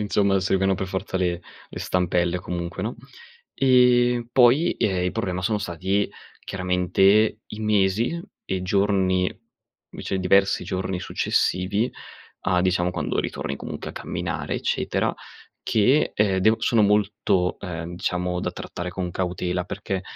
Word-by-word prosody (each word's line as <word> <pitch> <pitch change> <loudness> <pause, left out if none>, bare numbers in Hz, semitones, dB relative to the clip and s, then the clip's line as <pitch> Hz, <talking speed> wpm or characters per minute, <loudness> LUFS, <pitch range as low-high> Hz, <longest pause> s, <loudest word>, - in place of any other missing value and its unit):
insomma, 100 -2 +2
servivano 95 0 +2
per 95 0 -3
forza 95 +1 -3
le 90 -2 0 0.3
le - - -8
stampelle 90 -1 0
comunque, 90 0 -5
no, 110 +4 -3 0.6
ehm, 125 -2 +4
poi, 130 +8 +5
ehm, 95 -3 0
il 90 - -1
problema 90 -5 -2
sono 105 +2 +1
stati 95 +2 -1 0.3
chiaramente, 95 +3 +2
i 105 - -8
mesi 105 - +1 0.2
e 95 -1 -2
giorni 95 -1 +2 0.6
vece 95 - -4
diversi 95 +1 +3
giorni 95 0 -3
successivi, 100 +7 0 0.6
a 90 -1 +3
diciamo, 90 -1 +1
quando - - -2
ritorni 70 - -4
comunque, - - -6
a - - -13
camminare, - - -4
eccetera - - -1 0.5
che, 125 +8 +3
ehm, 100 -3 +2
devo 110 +4 +4
sono 115 -3 +3
molto, 100 -3 +2
ehm, 85 -2 -6
diciamo, 90 -1 -1
da - - -3
trattare 90 +1 -6
con 90 -1 -4
cautela, 90 0 -2
perché 95 0 -4
95 Hz, 135 wpm, -24 LUFS, 90-105 Hz, 0.6 s, poi